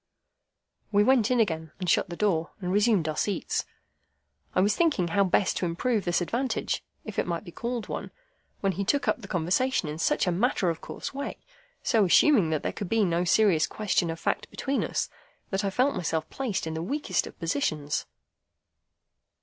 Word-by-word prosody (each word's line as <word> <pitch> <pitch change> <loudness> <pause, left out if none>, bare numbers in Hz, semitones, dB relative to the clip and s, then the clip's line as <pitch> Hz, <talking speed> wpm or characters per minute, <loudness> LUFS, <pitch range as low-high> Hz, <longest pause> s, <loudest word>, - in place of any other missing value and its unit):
We 205 0 +5
went 240 -2 +4
in 250 -1 +2
again, 160 -7 0
shut 175 - +2
the 170 - -5
door, 170 -5 +1
and 180 -2 -3
resumed 205 -5 +3
our 155 - -1
seats. 200 0 -1 0.9
I - - +4
was 205 +3 +3
thinking 290 - +2
how 200 +4 +3
best 190 +1 +2
to 180 - 0
improve 210 +6 0
this 175 0 +1
advantage, 245 +9 -1 0.2
if 215 - -4
it - - 0
might 170 +1 -2
be 175 - -10
called 235 +3 -4
one, - - -5 0.5
when 195 - +2
he 195 +1 -2
took 280 +8 +1
up - - +1
the 195 - -9
conversation 185 +5 +1
in 150 +1 -5
such - - +2
a 180 - +1
matter 190 -1 +1
of 165 - -7
course - - -6
way, 280 +1 -4 0.5
so 225 -5 +3
assuming 200 - +5
that 155 -2 -1
there - - -2
could 200 - -5
be 225 -2 +3
no 170 0 +1
serious 175 -5 +4
question 195 -5 0
of 165 0 -4
fact - - -1
between 275 +1 -1
us, - - -1 0.4
that 195 +1 0
I 200 - +1
felt 255 +8 +2
myself 160 -3 -1
placed 245 -11 -2
in 160 - -3
the 160 - -3
weakest 285 - -1
of - - -12
positions. 155 - -1
195 Hz, 190 wpm, -27 LUFS, 170-230 Hz, 0.9 s, We